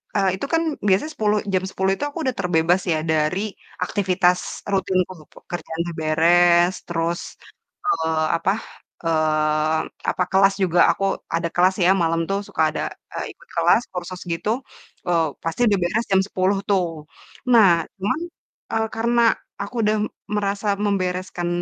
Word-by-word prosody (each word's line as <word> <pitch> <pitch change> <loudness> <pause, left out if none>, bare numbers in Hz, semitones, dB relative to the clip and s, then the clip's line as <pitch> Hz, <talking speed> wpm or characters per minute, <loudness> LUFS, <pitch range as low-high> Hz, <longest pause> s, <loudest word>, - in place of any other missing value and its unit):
eee, 195 -2 +3
itu - - -2
kan, 330 - +4
eee, 315 -3 -2
itu - - -26
kan 205 - 0
biasanya 200 +12 +2
sepuluh 210 -1 +1 0.2
jam 185 0 +2
10.00 190 0 0
itu - - -4
aku 290 - -10
udah 260 -2 -1
terbebas 175 0 +2
ya 160 - +2
dari 155 +4 +1 0.4
aktivitas 180 -2 +2 0.3
rutinku, 185 -1 +1 0.2
pekerjaan 165 -1 -7
udah 170 -1 -6
beres, 175 +3 +4
terus, 170 0 -1 0.7
eee, 160 - +1
apa, 185 +3 +1 0.5
eee, 155 -1 +1 0.3
apa, 180 - 0
kelas 195 +1 +5
juga 175 -1 +2
aku 195 - -4 0.3
ada 170 0 -1
kelas 185 +2 +4
ya - - +5
malam 165 0 +1
tuh 195 - 0
suka - - -2
ada, - - -3 0.3
eee, - - -3
ikut - - -21
kelas - - +4
kursus 180 0 -6
gitu, 165 +5 -3 0.6
eee, 170 -2 +3 0.2
pasti 165 +7 -3
udah 200 -2 +3
beres 215 +7 0
jam 190 0 +5
10.00 190 +1 +1
tuh. 190 -3 +3 0.7
Nah 225 -4 +7 0.3
cuman, 200 +10 0 0.5
eee, 220 0 +1
karena 235 +1 +2 0.4
aku 205 +5 -7
udah 215 +1 +2 0.4
merasa 200 0 -1 0.2
membereskan 185 -3 -1
185 Hz, 155 wpm, -22 LUFS, 170-200 Hz, 0.7 s, Nah